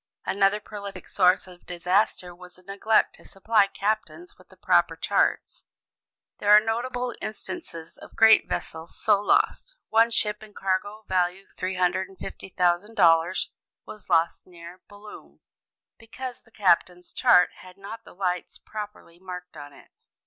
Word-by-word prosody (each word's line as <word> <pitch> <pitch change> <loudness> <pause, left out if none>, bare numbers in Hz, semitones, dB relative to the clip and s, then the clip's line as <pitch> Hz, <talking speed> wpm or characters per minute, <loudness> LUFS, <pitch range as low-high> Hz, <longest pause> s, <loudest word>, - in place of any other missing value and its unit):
Another 195 +1 +2
prolific 200 -2 -9
source 180 -1 +3
of 180 -1 -16
disaster 180 +1 0
was 180 0 -14
the 185 - -18
neglect 200 +3 +1
to - - -19
supply 205 +1 +2
captains 215 - -3
with - - -22
the - - -19
proper - - +2
charts. - - 0 0.8
There 205 - -1
are 210 0 +10
notable 245 +3 -2
instances 215 - -7
of - - -14
great 225 -1 +6
vessels 160 +1 -5
so 210 -3 +3
lost. - - +1
One 225 +1 +4
ship 210 -2 0
and 215 -1 -14
cargo, 200 +3 -2
value 185 +1 0
$350,000, 185 -1 0 0.4
was 215 -2 -12
lost 165 -1 +1
near 175 0 -13
Boulogne, 205 +1 -13 0.6
because 245 +2 -8
the 225 - -26
captain's 180 -3 +1
chart 180 - +5
had 185 -1 -14
not 205 +3 -9
the - - -16
lights 180 -1 -3
properly 210 -5 -9
marked 180 -1 -9
on 145 -1 -10
it. - - -18
195 Hz, 135 wpm, -25 LUFS, 180-215 Hz, 0.8 s, are